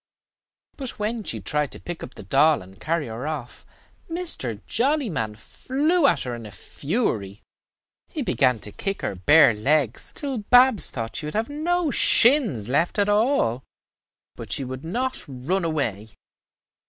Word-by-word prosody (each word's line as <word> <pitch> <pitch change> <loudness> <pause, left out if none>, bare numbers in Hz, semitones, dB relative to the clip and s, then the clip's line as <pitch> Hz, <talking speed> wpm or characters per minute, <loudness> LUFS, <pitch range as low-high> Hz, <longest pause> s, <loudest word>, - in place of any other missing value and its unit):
But 265 -3 -5
when 215 +2 -2
she - - -3
tried 150 -1 -1
to - - -4
pick 175 -1 -7
up 130 - -9
the - - -10
doll 150 -2 +3
and 95 +1 -17
carry 165 -1 -1
her 115 +5 -6
off, 150 -6 -6 0.4
Mr. 325 - -2
Jollyman 225 - 0
flew 285 - 0
at - - +2
her 125 - -4
in 115 -2 -7
a - - -11
fury. 105 - -3 0.6
He - - -4
began 125 -3 +2
to 105 - -7
kick 195 - -4
her - - -1
bare 130 - +5
legs 130 +3 0
till 275 -5 -3
Babs 245 +1 +5
thought 115 -2 -5
she 150 - -4
would 150 - -6
have 225 +4 -1
no 325 +2 0
shins 230 - +4
left 155 - 0
at 205 0 +2
all; 205 - +2 0.7
but - - -9
she 140 - 0
would 130 +1 -7
not 250 +10 -2
run 145 +8 -2
away. 120 - -2
155 Hz, 160 wpm, -24 LUFS, -, 0.7 s, bare